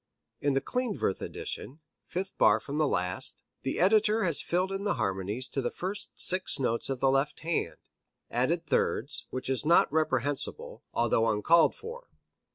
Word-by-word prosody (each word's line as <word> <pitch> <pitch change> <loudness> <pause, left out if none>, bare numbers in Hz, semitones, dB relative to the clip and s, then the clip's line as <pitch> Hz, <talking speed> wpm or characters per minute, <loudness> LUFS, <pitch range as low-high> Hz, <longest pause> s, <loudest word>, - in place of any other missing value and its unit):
In 145 -1 +1
the 135 - +1
Klindworth 230 - -1
edition, 140 +5 -5 0.3
fifth 190 +2 -4
bar - - +5
from 145 +2 -5
the 155 - +3
last, 90 -5 -1 0.2
the 135 - -2
editor 215 +3 +4
has 170 -5 +2
filled 180 +2 0
in 195 +1 -3
the 205 - 0
harmonies 100 +5 -1
to 135 - -2
the 120 - -1
first 195 +3 -4
six 185 0 +2
notes 120 -3 0
of 135 -2 -3
the 135 - +4
left 135 +2 0
hand, 165 +1 -2 0.5
added 160 +8 0
thirds, 140 -2 -1
which 130 - -5
is 130 -3 +1
not 160 -2 +4
reprehensible, 145 -3 -1
although 115 -1 +2
uncalled 160 +11 +4
for. 475 +3 -9
145 Hz, 165 wpm, -29 LUFS, 125-185 Hz, 0.5 s, bar